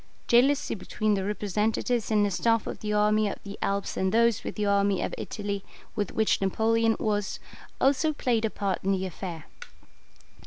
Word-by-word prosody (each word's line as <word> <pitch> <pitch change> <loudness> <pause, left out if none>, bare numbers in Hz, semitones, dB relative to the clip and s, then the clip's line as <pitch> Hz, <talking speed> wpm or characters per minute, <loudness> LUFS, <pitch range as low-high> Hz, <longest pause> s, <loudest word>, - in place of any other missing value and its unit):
Jealousy 270 +4 +3
between 215 +1 -1
the 195 -1 0
representatives 210 +3 -1
in 215 -2 +3
the 205 - +1
staff 230 +4 +1
of - - -5
the 210 - -3
army 210 0 +3
of - - -4
the 200 0 -7
Alps 200 0 -1
and 190 0 0
those 230 0 +3
with - - -5
the 210 - -1
army 200 -1 +2
of - - -2
Italy, 200 -2 -4 0.3
with 205 -3 -2
which 220 -2 +1
Napoleon 225 +3 +2
was, 205 -2 -1 0.4
also 280 +4 +3
played 245 -6 0
a 220 - +1
part 200 -2 -2
in 195 +1 +2
the 190 0 -1
affair. 175 -3 -6
210 Hz, 180 wpm, -27 LUFS, 200-225 Hz, 0.4 s, Jealousy